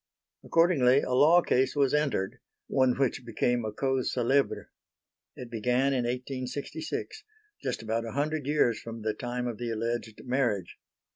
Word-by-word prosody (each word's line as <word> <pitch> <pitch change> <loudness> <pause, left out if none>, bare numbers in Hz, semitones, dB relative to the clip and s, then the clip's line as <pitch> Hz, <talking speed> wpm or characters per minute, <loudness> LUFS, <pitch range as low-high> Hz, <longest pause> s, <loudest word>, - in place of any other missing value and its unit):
Accordingly 145 -6 +4
a - - -4
law 160 +7 +6
case 130 +3 +1
was 140 -2 +2
entered. 140 -10 0 0.3
One 130 -2 +2
which 135 -1 0
became 120 +1 0
a 110 - -3
cause 130 +3 0
célèbre. 130 +3 +1 0.7
It 125 -2 -9
began 125 +4 +1
in 125 -2 0
1866 135 - -4 0.4
just - - -3
about 115 +1 -1
a 115 - -6
hundred 145 +1 -1
years 145 -6 +2
from 115 -1 -8
the 110 0 0
time 125 +2 -4
of 120 -3 -4
the 120 -1 -3
alleged 115 0 -3
marriage. 120 -8 -1
125 Hz, 150 wpm, -28 LUFS, 115-140 Hz, 0.7 s, law